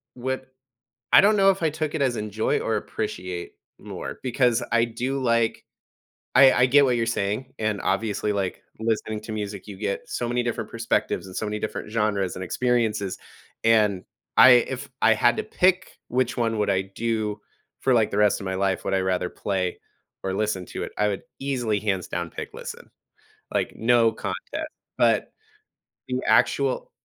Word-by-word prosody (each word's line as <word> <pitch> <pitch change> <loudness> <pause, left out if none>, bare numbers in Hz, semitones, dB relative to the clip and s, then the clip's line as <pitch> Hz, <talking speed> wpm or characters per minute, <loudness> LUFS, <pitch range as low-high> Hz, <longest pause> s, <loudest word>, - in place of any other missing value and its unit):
what 130 +1 -3 0.7
I - - +10
don't 210 +2 +4
know 195 -1 +6
if 195 -2 -1
I 160 - +2
took 155 0 -3
it 155 - 0
as 130 -3 +1
enjoy 105 0 -1
or 110 - 0
appreciate 90 -5 -4 0.3
more - - -7
because 125 -2 +2
I 115 0 +4
do 125 +4 -3
like 115 -2 +1 0.7
I 135 0 +9
I 125 - +4
get 140 +2 +5
what 125 -2 +2
you're 115 - +1
saying, 115 +3 -2
and 110 -2 -1
obviously, 105 +1 0
like, 95 -2 -3 0.2
listening 110 -1 -1
to 110 - -8
music, 105 -2 -5
you 100 -2 -8
get 100 0 -3
so 120 - -2
many 120 0 0
different 120 -1 -3
perspectives 115 -5 -1
and 95 - -10
so - - -2
many 105 0 -3
different 105 - -5
genres 105 -4 0
and 95 - -5
experiences, 110 -2 0 0.5
and 105 -4 +3 0.3
I 130 - +10
if 125 +2 +2
I 115 - +6
had 120 +2 +3
to - - -1
pick 185 0 +1
which 125 0 0
one 115 -2 0
would 105 - +1
I 95 -1 +2
do 105 +1 -3 0.4
for, 130 - +3
like, 115 -3 +3
the 100 - -2
rest 105 -1 +3
of - - -6
my 95 0 -2
life, 95 0 0
would - - -1
I 95 - +3
rather 90 -1 0
play 95 -3 -2 0.4
or 95 - -2
listen 100 -2 -1
to - - -5
it, - - -6
I 105 - +2
would 100 -2 -2 0.2
easily 125 -6 -1
hands 95 -3 -1
down 85 -1 -3
pick - - -7
listen. - - -9 0.6
Like, - - -1
no 115 0 +4
contest. 110 - -5 0.3
But - - +2 0.8
the - - -1
actual - - +2
110 Hz, 180 wpm, -25 LUFS, 100-125 Hz, 0.8 s, I